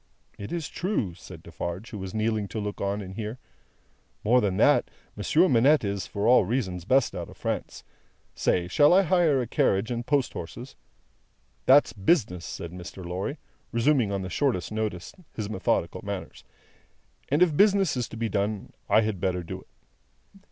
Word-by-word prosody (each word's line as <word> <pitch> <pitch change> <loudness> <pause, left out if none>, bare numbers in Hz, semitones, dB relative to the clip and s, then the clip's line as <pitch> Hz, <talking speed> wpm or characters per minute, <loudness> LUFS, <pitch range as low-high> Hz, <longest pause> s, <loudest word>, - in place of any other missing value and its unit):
"It 100 - -8
is 170 -3 -3
true," 175 - -2
said - - -12
Defarge, 90 +8 -6
who 105 - -6
was 95 0 -5
kneeling 110 -1 0
to 110 - -5
look 105 0 -4
on 100 +1 -1
and 95 0 -8
hear. 110 +3 -5 0.9
"More 125 +4 +4
than 95 -3 0
that; - - +4 0.3
Monsieur 155 - +3
Manette 140 +2 +4
is, 100 -1 -2
for 100 +1 -2
all 125 -2 +6
reasons, 95 -5 -2
best 130 +3 +3
out - - -5
of - - -14
France. - - -4 0.5
Say, 90 -1 +1
shall 145 - +5
I 195 - +6
hire 165 -7 +3
a - - -4
carriage 105 0 +1
and 120 0 -2
post 140 0 0
horses?" 110 +11 -8 0.9
"That's 140 +3 +6
business," 100 - +1
said 85 - -6
Mr. 90 +1 -9
Lorry, 95 - -3 0.3
resuming 120 -2 +2
on 100 -1 -2
the 95 - -5
shortest 120 -6 0
notice 110 -5 -3 0.2
his 110 -2 -4
methodical 95 - -1
manners; - - -6 0.9
"and 150 +6 +4
if 165 -5 +1
business 195 -3 +4
is 125 -2 -2
to 115 - -8
be 115 0 -1
done, 100 0 -2 0.2
I 110 - +5
had 105 -4 -2
better 90 -2 0
do 80 - -7
it." - - -22
110 Hz, 175 wpm, -26 LUFS, 95-135 Hz, 0.9 s, all